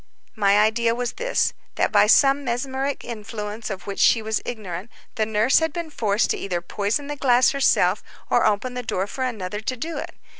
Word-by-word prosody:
My 200 -2 +3
idea 230 +2 +2
was 245 0 -3
this—that - - -1
by - - +5
some 275 0 +5
mesmeric 265 +2 -2
influence 215 -1 -6
of 195 -2 -6
which 200 -1 -5
she 230 - +5
was 220 0 -2
ignorant, 205 -3 -6 0.2
the 215 -1 -1
nurse 220 +4 +3
had 320 0 -1
been 340 -3 -5
forced 215 -5 +1
to - - -1
either 180 -3 -2
poison 205 +9 -2
the 295 +1 -5
glass 255 -3 +4
herself 210 -8 +2 0.3
or 240 - +2
open 215 +4 +1
the 250 - -3
door 195 -5 -2
for 260 +6 -5
another 210 -5 -3
to 255 +3 -3
do 325 +6 -4
it. - - -7
230 Hz, 190 wpm, -23 LUFS, 210-260 Hz, 0.3 s, by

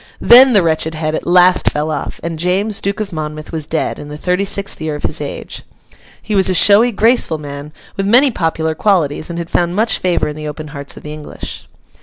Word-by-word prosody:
Then 255 +2 +7
the 200 -4 +4
wretched 160 0 -1
head 155 0 -2
at - - -4
last 180 +1 +4
fell 150 +1 -2
off, 145 - -5
and 165 -1 -4
James, 195 +5 0
Duke 200 +1 -2
of 205 -3 -4
Monmouth, 155 -1 -6
was 155 -2 -5
dead, 160 - -2
in 145 - -8
the 150 0 -8
thirty 180 +5 -1
sixth 200 -3 -1
year 155 -1 -3
of 150 - -8
his - - -2
age. - - -6 0.6
He 215 - -6
was 190 -2 +3
a 185 - 0
showy, 210 +7 +5
graceful 225 -6 +2
man, 145 0 -8 0.2
with 195 -1 -2
many 255 +6 +5
popular 160 -4 -1
qualities, 155 -5 0
and 170 - -5
had 170 -1 -6
found 175 0 0
much 220 +2 +1
favour 180 -2 0
in 150 - -5
the 155 0 -6
open 150 0 -7
hearts 140 -1 -8
of - - -12
the 150 - -7
English. 150 -1 -9
170 Hz, 225 wpm, -16 LUFS, 155-200 Hz, 0.6 s, Then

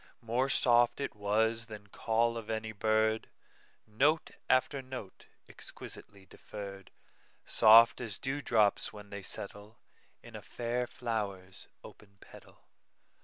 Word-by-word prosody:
More 120 +4 0
soft 120 -1 +5
it 140 - -3
was 110 +2 0
than 105 -2 -10
call 115 +3 0
of 115 -2 -7
any 110 0 -3
bird, 110 +1 0 0.6
Note 145 +9 +1 0.2
after 130 +2 +2
note, 130 -7 -10 0.2
exquisitely 100 -1 -9
deferr'd, 100 0 -10 0.6
Soft 115 +3 +6
as 110 -5 -3
dew 135 +2 -3
drops 110 -6 +2
when 105 -1 -13
they 100 0 -6
settleIn 105 +3 -7 0.6
a - - -8
fair 120 +1 -3
flower's 100 - -5 0.2
open 100 -1 -15
petal. - - -17
110 Hz, 120 wpm, -31 LUFS, 105-120 Hz, 0.6 s, Soft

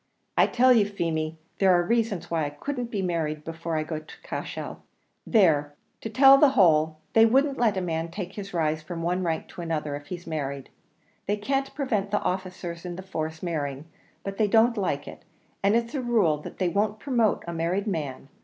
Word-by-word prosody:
"I - - +5
tell 255 +1 +5
you, 225 -4 +5
Feemy, 160 -5 -2 0.2
there 195 -1 +5
are 175 0 +4
reasons 205 -5 0
why 160 -2 +1
I - - -2
couldn't 250 - -4
be 205 -4 -2
married 155 -4 -2
before 165 0 -4
I 155 - 0
get 155 0 -6
to - - -13
Cashel. - - -5 0.5
There, 150 - +3 0.3
to 225 - -4
tell 270 +5 +7
you 275 - +7
the 295 - +8
whole, 160 -4 +4 0.2
they 225 - +7
wouldn't 270 +4 +2
let 220 -5 +2
a - - 0
man 165 -2 -2
take 180 +1 -6
his 200 -1 -7
rise 155 -2 0
from 165 +1 -6
one 180 +2 0
rank 165 -2 -2
to - - -8
another 155 -3 -2
if 145 0 -9
he's 175 -1 -7
married. 140 -4 -4 0.6
They 205 +1 +1
can't 270 +6 -2
prevent 220 -9 -1
the 205 - 0
officers 180 -2 -4
in 175 -1 -5
the 190 - -7
force 160 -3 -5
marrying, 145 -4 -3 0.4
but 195 0 -5
they 215 - +4
don't 225 +3 +4
like 180 -9 -2
it; - - -9 0.4
and 200 +2 +3
it's 235 0 0
a 275 - -1
rule 215 -11 +2
that - - -9
they 185 -2 +1
won't 205 +4 0
promote 235 -2 +1
a 170 - -5
married 170 +5 -1
man. 145 - -4
180 Hz, 210 wpm, -26 LUFS, 160-215 Hz, 0.6 s, the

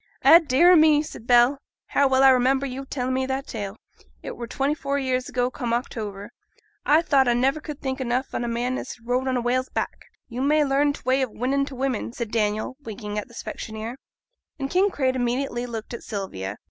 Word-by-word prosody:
'Eh 335 - +9
dear 330 +2 +4
a' - - +8
me!' 310 -2 +5
said 240 -6 -10
Bell, 245 +3 +5 0.3
'how 280 - +3
well 265 0 +3
I 265 -1 +8
mind 265 +2 +2
yo'r 270 0 -5
telling 260 -1 -2
me 260 0 0
that 265 +1 -2
tale! 205 -2 -6 0.5
It - - -6
were 235 - -6
twenty 275 +5 0
four 280 -2 -2
year 260 -2 +1
ago 250 0 -2
come 240 -4 -2
October. 210 -3 -5 0.5
I 310 +3 +4
thought 270 -5 +3
I 240 - +3
never 270 +5 +1
could 300 -1 -8
think 265 -1 -3
enough 255 +1 -1
on - - -2
a - - -2
man 240 +2 -1
as - - -6
had 235 - -23
rode 250 +2 0
on 260 -1 +1
a - - 0
whale's 255 +2 0
back!' - - -4 0.2
'Yo' 245 +1 -5
may 300 +2 +3
learn 280 +1 +2
t' - - -11
way 260 +1 +2
of 260 - 0
winnin' 270 +5 0
t' 275 - -9
women,' 255 -3 -2
said 235 -3 -5
Daniel, 215 +3 -1
winking 210 -4 -5
at 210 - -7
the 235 - -16
specksioneer. 220 +3 -6 0.6
And 270 -1 -4
Kinraid 360 -9 +2
immediately 245 0 -1
looked 225 -1 -6
at 235 - -6
Sylvia. 105 - -5
255 Hz, 220 wpm, -24 LUFS, 235-275 Hz, 0.6 s, Eh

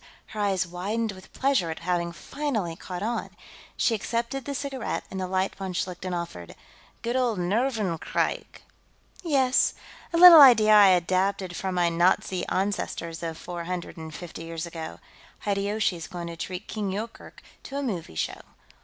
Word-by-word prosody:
Her 215 - -7
eyes 195 -3 +1
widened 205 +6 -2
with 185 -1 -13
pleasure 265 -11 +1
at 160 - -4
having 170 0 -1
finally 220 - -3
caught 180 +2 -6
on; 235 +2 -2 0.5
she 235 - +2
accepted 235 +5 -2
the 280 - -4
cigarette 275 -3 -3
and 190 - -4
the 185 - -2
light 190 +1 0
von 190 -2 -5
Schlichten 180 +1 -3
offered. 170 - -5 0.5
"Good 235 +1 -1
old 245 -5 +1
nervenkrieg!" 205 -1 -1 0.6
"Yes. 270 -6 +3 0.4
A 335 - 0
little 340 -3 +11
idea 220 -6 +8
I 205 -1 +9
adapted 185 +1 +1
from 190 -1 -3
my 175 -1 +3
Nazi 175 +2 +1
ancestors 180 -4 -2
of 165 -1 -4
four 175 -1 -6
hundred 180 0 -4
and 160 -2 -8
fifty 165 0 -8
years 165 0 -5
ago. 165 -2 -7 0.4
Hideyoshi's 200 -4 -1
going 175 -2 -6
to 170 0 -6
treat 180 +4 -6
King 210 -3 -3
Yoorkerk 220 +4 -7 0.2
to 275 - -7
a 285 - -2
movie 180 - -4
show. - - -3
190 Hz, 160 wpm, -26 LUFS, 175-230 Hz, 0.6 s, little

